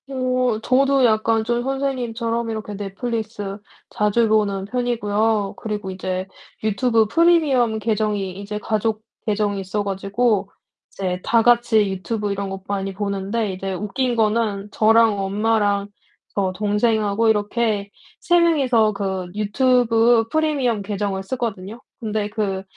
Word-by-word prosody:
어 255 -3 0
저도 270 +2 +3
약간 220 0 +2
좀 240 +1 0
선생님처럼 240 -3 -2
이렇게 215 -2 -5
넷플릭스 205 0 -4 0.3
자주 210 +2 +2
보는 205 -3 +1
편이고요. 220 -3 0
그리고 210 -3 -4
이제 185 0 -4 0.4
유튜브 220 +2 +2
프리미엄 275 -5 +3
계정이 210 -3 -1
이제 205 +1 -5
가족 215 +1 -1 0.2
계정이 205 -1 0
있어 200 +2 -2
가지고 200 +1 0 0.4
이제 185 -2 -3
다 230 -1 +3
같이 235 -3 +4
유튜브 205 +2 -3
이런 200 0 -3
거 195 0 -6
많이 195 -1 -2
보는데 200 +1 -2
이제 190 +1 -4
웃긴 210 +6 -1
거는 215 -2 0
저랑 225 -1 +4
엄마랑 205 0 +1 0.5
저 195 -2 0
동생하고 210 +1 +1
이렇게 210 -1 0 0.3
3 350 0 +3
명이서 260 -10 +3
그 190 -2 -3
유튜브 230 +1 +3
프리미엄 290 -8 +1
계정을 200 -1 -2
쓰거든요. 220 -2 -4 0.2
근데 215 -2 -2
그 200 -3 -2
215 Hz, 285 characters per minute, -21 LUFS, 200-235 Hz, 0.5 s, 같이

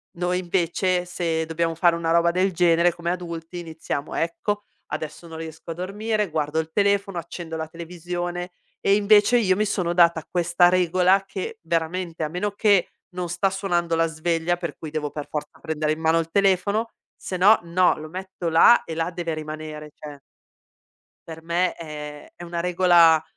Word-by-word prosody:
Noi, 180 +1 0
invece, 180 0 0
se 165 -2 -2
dobbiamo 165 0 -1
fare 170 0 +4
una 165 -1 -2
roba 170 +1 +3
del 185 +2 +1
genere, 170 0 +3
come 170 0 -4
adulti, 170 -1 -6
iniziamo: 160 -3 -5
"Ecco, 205 +5 -2 0.2
adesso 155 +2 -6
non 160 -1 -8
riesco 160 0 -8
a 165 - -3
dormire, 210 +4 -2
guardo 150 0 -1
il 160 0 -2
telefono, 200 -2 +1
accendo 165 -1 -6
la 160 0 -4
televisione" 175 +1 -5 0.3
e 195 - +4
invece 210 +3 +5
io 190 -5 +3
mi 215 - +1
sono 185 -4 -1
data 170 -2 +3
questa 175 0 +3
regola 185 +2 +3
che, 450 - -6
veramente, 165 0 -2
a - - -2
meno 180 +6 -2
che 200 -2 +3 0.2
non 180 -1 -4
sta 175 +3 0
suonando 175 -3 -1
la 165 0 +2
sveglia, 165 +2 -1
per 170 -4 -5
cui 155 - -8
devo 150 -1 -3
per 150 0 -7
forza 150 -1 -6
prendere 155 -1 -1
in 155 - -5
mano 160 +1 +3
il 165 0 -3
telefono, 200 +3 +2 0.3
se 185 - -6
no, 205 +5 +6
no, 175 +2 +3
lo 155 +1 -8
metto 185 0 -5
là 165 +9 +6
e 165 - -6
là 165 +1 -1
deve 170 -2 -3
rimanere, 155 0 -7
cioè 145 -2 -10 1.1
per 160 0 -9
me 170 +2 0
è 150 -2 -8
è - - -12
una 170 0 -4
regola 170 -2 +5
170 Hz, 175 wpm, -24 LUFS, 160-185 Hz, 1.1 s, no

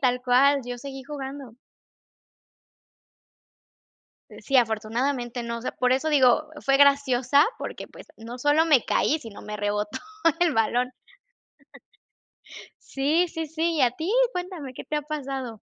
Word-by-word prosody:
tal 250 -1 +1
cual, 270 +3 +4
yo 245 0 -6
seguí 270 0 -8
jugando. 275 -4 -7 2.8
Eh, - - -13
sí, 275 - +1
afortunadamente, 240 +2 0
no, 235 0 -4
o - - -10
sea, - - -3
por 250 0 +1
eso 270 +4 0
digo, 290 0 +4 0.2
fue 275 0 +4
graciosa, 280 0 +4
porque, - - -7
pues, - - -14
no 235 +2 -9
solo 290 +4 +3
me 295 -7 +4
caí, 310 - +1
sino 225 -8 -11
me 210 0 -6
rebotó 210 0 -2 0.4
el 345 -4 +3
balón. 245 +3 +1 1.9
Sí, 305 +6 0
sí, 325 -1 -5
sí, 325 +2 -1
¿y 280 - +2
a 245 -1 +3
ti? 325 +8 -4 0.2
Cuéntame, 355 -7 -6
¿qué - - -8
te 300 - -3
ha 300 - -2
pasado? 270 -6 -5
270 Hz, 145 wpm, -25 LUFS, 245-295 Hz, 2.8 s, cual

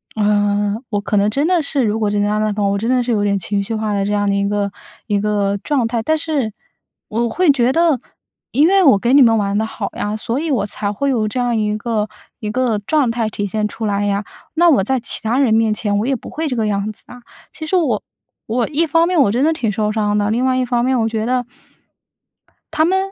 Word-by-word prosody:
呃， 205 -1 +1
我 205 -2 -1
可 210 - -2
能 200 +1 +3
真 280 +8 0
的 355 -2 +2
是， 280 -2 0
如 220 0 0
果 210 - +1
这 205 - 0
个 205 - +2
样子 215 +1 0
的 205 0 -3
话， 200 - +2
我 200 - 0
真 225 +4 -2
的 255 -1 +3
是 245 0 -2
有 205 -2 +1
点 200 -1 +1
情 200 +3 -1
绪 225 +3 -5
化 215 -1 -2
的 200 -1 0
这 205 - -2
样 205 0 +1
的 200 - +1
一 200 0 0
个 205 -1 -1 0.4
一 205 -2 +1
个 200 -1 0
状 270 -6 +1
态。 230 -1 -1
但 315 +5 +1
是 295 -8 -2 0.6
我 235 +2 -1
会 355 +4 +3
觉 250 -2 +2
得- 330 -6 +3 0.5
因 295 +6 +4
为 390 +1 +4
我 270 - +6
跟 240 +5 +2
你 - - +7
们 225 -3 +5
玩 200 -1 -1
得 220 - +1
好 220 - -5
呀， 210 +1 -2
所 230 +4 -2
以 325 +1 -3
我 240 -7 +1
才 205 0 -3
会 280 +7 -1
有 225 -5 +1
这 230 +4 -3
样 245 -1 0
一 210 -1 0
个 215 -1 -2 0.3
一 210 - -4
个 240 -3 0
状 270 +5 +1
态 230 -2 -1
体 205 -1 -3
现 210 +1 -1
出 225 +1 -6
来 205 0 0
呀。 200 0 0 0.3
那 345 +1 +5
我 270 -11 +4
在 260 +5 0
其 230 - -4
他 230 +4 0
人 255 -6 +3
面 220 -1 +3
前 205 -1 -1
我 225 - -1
也 270 - +1
不 235 - -9
会 320 +1 -3
这 255 - -2
个 225 - 0
样 205 +1 -1
子 215 - -16
啊。 245 - -12 0.3
其 315 - -7
实 375 - 0
我 280 - +1 0.4
我 235 +1 0
一 320 +2 +1
方 330 +3 +3
面 355 -4 +3
我 205 -7 +3
真 250 +5 +1
的 320 - +3
挺 230 -9 -1
受 210 +1 -1
伤 210 -1 0
的。 205 +1 +1
另 245 +3 +1
外 260 0 +2
一 255 - +1
方 240 -1 0
面， 260 -1 +1
我 225 - +1
觉 220 -1 -2
得 250 0 0 1.3
他 310 - +2
们 375 +3 +2
225 Hz, 285 characters per minute, -18 LUFS, 205-260 Hz, 1.3 s, 你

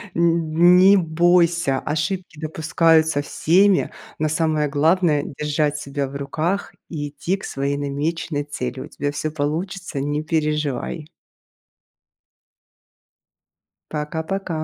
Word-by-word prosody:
Н 170 +1 +4
не 195 +2 +7
бойся: 170 -3 +2
ошибки 165 +2 -3
допускаются 160 -1 +2
всеми, 185 +6 +2 0.3
но 155 - +1
самое 155 -1 0
главное- 155 0 +2 0.2
держать 150 0 0
себя 140 -1 -3
в 135 - -10
руках 155 +7 -2 0.2
и 145 -3 -4
идти 175 +7 -2
к - - -14
своей 140 +1 -2
намеченной 145 +2 -2
цели. 130 -3 -5
У - - -7
тебя 145 0 -3
всё 155 +1 -3
получится, 160 +2 -3
не 145 +2 -2
переживай! 150 -1 -2 2.8
Пока-пока. 160 +2 -3
155 Hz, 105 wpm, -21 LUFS, 145-170 Hz, 2.8 s, не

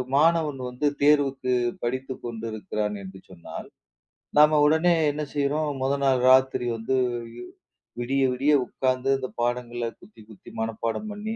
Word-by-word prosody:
மாணவன் 155 -2 +3
வந்து 125 +4 -1
தேர்வுக்குப் 135 -4 +2
படித்துக் 130 +2 -3
கொண்டிருக்கிறான் 110 -2 -4
என்று 95 0 -10
சொன்னால், 90 -2 -9 0.7
நாம 150 0 +6
உடனே 160 +4 +4 0.2
என்ன 150 +1 -4
செய்றோம்? 145 +2 0
மொத 135 +1 +1
நாள் 130 -2 +3
ராத்திரி 130 -1 +4
வந்து 115 +4 -1 0.4
யு 120 - -8 0.6
விடிய 135 +3 0
விடிய 140 +4 +2
உக்காந்து 130 +1 -1
அந்தப் 130 -2 -7
பாடங்களை 120 -1 -2
குத்தி 210 - -17
குத்தி 105 - -14
மனப்பாடம் 115 - -3
பண்ணி, 215 +2 -5
130 Hz, 130 wpm, -25 LUFS, 120-150 Hz, 0.7 s, நாம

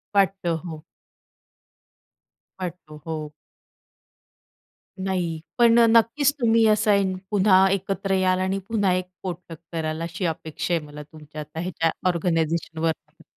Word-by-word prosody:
वाटतं, 190 -4 +2
हो. 160 -3 -7 1.8
वाटतं, 170 -4 -7
हो. 155 -2 -4 1.7
नाही, 180 -4 -1 0.2
पण 235 -1 +6
नक्कीच 235 +5 +4
तुम्ही 230 -2 +4
असं 205 -3 +3 0.2
पुन्हा 190 -1 +5
एकत्र 195 0 -1
याल 185 -1 +2
आणि 190 +1 0
पुन्हा 205 -5 +2
एक 185 0 -1 0.2
पोटलक 175 -3 -6
कराल, 160 -1 -3
अशी 170 +3 -3
अपेक्षा 160 +1 -3
आहे 165 -3 0
मला 150 0 -9
तुमच्या 150 0 -10
आता 155 +2 -8
ह्याच्या 165 -2 0 0.2
ऑर्गनायझेशनवरनं. 165 -1 -1
180 Hz, 110 wpm, -24 LUFS, 160-195 Hz, 1.8 s, पण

